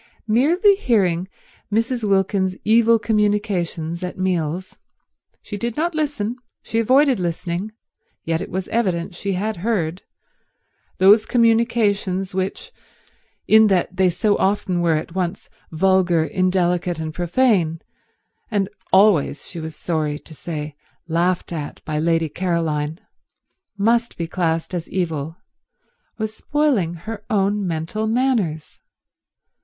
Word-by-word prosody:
Merely 315 - +4
hearing 190 - +1 0.4
Mrs. 230 +3 0
Wilkins's 195 -2 +1
evil 230 +1 +5
communications 205 -6 -1
at 180 - -5
meals—she 185 +3 -5
did 235 +2 -3
not 340 +3 0
listen, 280 -7 -2 0.3
she 225 - -1
avoided 260 +1 +4
listening, 175 +3 -3 0.5
yet 165 0 -1
it - - -5
was 185 +1 -3
evident 185 -6 -1
she 195 +3 -3
had 210 +3 -2
heard—those 190 +2 -1
communications 225 -6 +2
which, 195 - -3 0.8
in 220 0 +7
that 185 -2 +1
they 185 -1 +3
so 205 +4 +1
often 190 -2 +1
were 170 -2 +2
at 155 +2 -4
once 185 0 -3 0.2
vulgar, 175 -1 +2
indelicate 180 -1 0
and 160 -1 -4
profane, 175 -2 +1 0.7
and 205 -4 0 0.2
always, 190 -7 +3
she 175 - -7
was 160 -1 -6
sorry 155 -3 -2
to 160 - -15
say, 150 -2 -6 0.3
laughed 175 +2 0
at 150 -3 -5
by 155 -1 -2
Lady 165 0 +1
Caroline, 160 -2 -2 0.8
must 230 +3 +1
be 170 - -2
classed 165 0 -1
as 175 -2 -4
evil, 165 -3 -3 0.8
was 220 -1 -3
spoiling 255 - 0
her 210 +5 -7
own 200 -2 +1
mental 170 +7 -2
manners. 220 - 0
190 Hz, 115 wpm, -21 LUFS, 170-220 Hz, 0.8 s, in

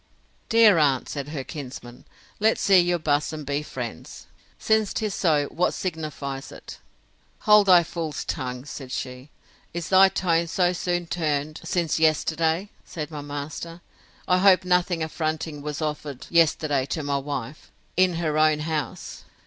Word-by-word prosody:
Dear 220 -6 +6
aunt, 140 -4 +2
said 140 -2 -5
her 145 -3 -4
kinsman, 130 -4 -9 0.3
let's 220 +1 +3
see 195 -2 +5
you 175 0 +2
buss 150 -2 0
and 155 -2 -7
be 145 +1 -1
friends: 120 - -7 0.3
since 220 -2 +1
'tis 215 -2 -1
so, 150 -5 +2
what 180 - 0
signifies 150 -5 -5
it? - - -11 0.6
Hold 210 -1 +6
thy 180 -2 +7
fool's 160 -3 -5
tongue! 125 0 -4
said 135 -3 -8
she: 125 +1 -5 0.5
Is 170 -1 -4
thy 190 0 +7
tone 170 -3 +1
so 180 +1 +1
soon 175 0 -2
turned 155 -2 -2
since 170 -3 -1
yesterday? 160 +4 +1
said 155 -3 -7
my 150 -1 -6
master, 145 +4 -6 0.5
I 180 0 +3
hope 185 -1 +5
nothing 180 -2 +1
affronting 155 -1 -3
was 150 +1 -4
offered 150 -3 -4
yesterday 155 -5 +2
to 155 +2 -3
my 140 -1 0
wife, 140 0 -6 0.2
in 185 -1 +3
her 155 -2 -1
own 155 -1 +3
house. 150 -4 -4
155 Hz, 150 wpm, -24 LUFS, 145-175 Hz, 0.6 s, thy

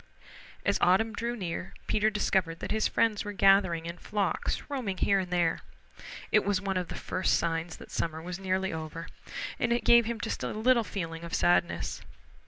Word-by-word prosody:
As - - +2
autumn 220 +5 +4
drew 235 +3 -2
near 185 -3 -5
Peter 215 0 +2
discovered 190 -5 0
that - - -5
his 220 0 +2
friends 220 -3 +1
were 205 -1 -5
gathering 195 -4 +4
in 170 +1 -6
flocks, 200 -5 -1
roaming 245 -10 -3
here 195 +1 +3
and 185 -1 -3
there. 175 -2 +1 0.7
It 215 - +5
was 200 -1 +1
one 195 0 -2
of 180 -1 -1
the - - -6
first 185 - 0
signs 165 0 -1
that - - -13
summer 160 -1 -2
was 175 +2 -6
nearly 190 -1 -1
over, 160 +1 -6 0.5
and 240 - +1
it 240 - +1
gave 235 -1 +7
him 235 -1 -3
just 225 - -3
a - - -2
little 235 +2 +3
feeling 165 -5 -5
of 170 - -3
sadness. 175 0 +1
190 Hz, 190 wpm, -29 LUFS, 170-215 Hz, 0.7 s, gave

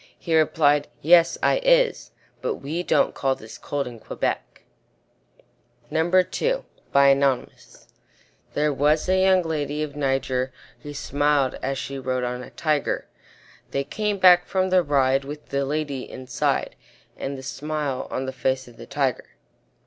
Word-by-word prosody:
He 165 -2 -1
replied, 150 -2 +3 0.2
"Yes, 170 +2 +5
I - - +3
is - - +3 0.3
But - - -1
we 155 +5 -4
don't - - +2
call 135 -1 0
this 110 -2 -12
cold 145 -1 -3
in 120 -2 -9
Quebec." - - -4 1.3
RUDYARD 175 +4 +2
KIPLING 140 - +1 1.1
There 150 0 +2
was 150 +3 +2
a 185 0 +3
young 190 -1 +4
lady 150 -2 -2
of 145 -2 -6
Niger 135 -2 -1 0.3
Who 145 -1 -8
smiled 145 -1 +1
as 135 0 -2
she 135 +1 -5
rode 130 -1 -2
on 125 0 -3
a - - -9
Tiger; 150 -3 -1 0.6
They 140 - -1
came 210 +8 -2
back 180 -2 +6
from 185 -1 0
the 185 -1 +5
ride 135 -3 +2
With 150 +2 -9
the 140 0 0
lady 145 -3 -3
inside, 130 -1 -2 0.4
And 135 0 -5
the 130 - -9
smile 145 0 -3
on 130 - -3
the 130 - -4
face 130 +1 -1
of 120 -1 -16
the 115 - -11
Tiger. 135 -4 -2
145 Hz, 150 wpm, -24 LUFS, 135-160 Hz, 1.3 s, back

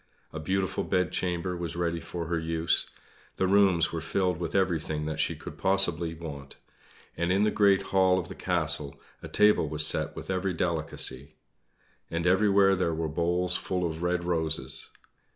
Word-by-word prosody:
A 80 - -5
beautiful 95 +4 -1
bedchamber 90 0 -1
was 85 -1 -5
ready 85 -1 -1
for 85 0 -6
her 85 0 -1
use; 80 0 +1 0.5
the 95 - 0
rooms 95 -4 +3
were 85 - -4
filled 90 +1 -1
with 85 0 -4
everything 80 -5 0
that 80 0 -4
she - - +1
could - - -10
possibly 85 -4 +1
want, 70 -4 -9 0.6
and 85 +1 -1
in 95 +2 +3
the 105 - +2
great 100 -2 +3
hall 95 -1 +4
of 90 -2 -3
the - - -8
castle 80 -5 0 0.2
a - - -7
table 105 -7 +3
was 75 0 +2
set - - +1
with - - -6
every 95 -1 -1
delicacy. 80 -5 0 0.7
And 85 +1 -3
everywhere 95 +1 +4
there 85 -3 -1
were 80 0 -2
bowls 90 +3 0
full 90 -1 -2
of 80 -1 -4
red 90 0 0
roses. 80 -6 -1
85 Hz, 170 wpm, -28 LUFS, 80-95 Hz, 0.7 s, hall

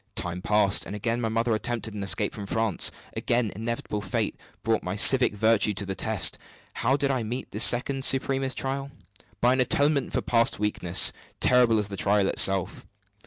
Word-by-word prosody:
Time 90 +1 -4
passed; 105 0 +2
and 100 - -6
again 115 +3 -3
my 115 - -2
mother 115 +1 -1
attempted 110 -1 -4
an 105 - -6
escape 100 - -1
from 100 -2 -8
France. 110 -2 +1 0.3
Again, 120 -3 -1
inevitable 110 -1 -5
fate 95 - -3 0.3
brought 115 -1 0
my 90 +2 -5
civic 125 +2 +4
virtue 110 -1 +2
to 100 - -3
the 95 - -4
test. 95 -6 +1 0.3
How 130 +4 0
did 140 -1 0
I 130 -2 -1
meet 120 +4 -6
this 105 +3 +1
second 135 +2 +1
supremest 135 0 +1
trial? 135 +1 -4 0.5
By 125 +1 +3
an 130 - -1
atonement 140 +2 +1
for - - -2
past 115 +1 +1
weakness, 95 -4 +2 0.3
terrible 125 -3 +3
as 105 -1 -2
the 100 - -7
trial 100 +1 +1
itself. 95 -1 +1
110 Hz, 180 wpm, -25 LUFS, 100-125 Hz, 0.5 s, civic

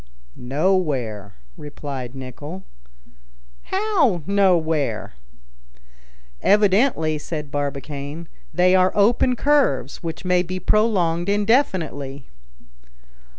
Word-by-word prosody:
"Nowhere," 130 - -1 0.2
replied 140 -4 -7
Nicholl. 145 +8 -8 1.0
"How, 375 - +1
nowhere?" 160 - +1 1.3
"Evidently," 200 - +3
said 150 -1 -6
Barbicane, 145 +2 -5 0.2
"they 180 +1 +3
are 185 0 +4
open 235 +5 +3
curves, 270 - +1
which 165 +1 -6
may 180 0 +3
be 185 +1 -4
prolonged 185 -4 +1
indefinitely." 185 - 0
170 Hz, 75 wpm, -22 LUFS, 145-200 Hz, 1.3 s, are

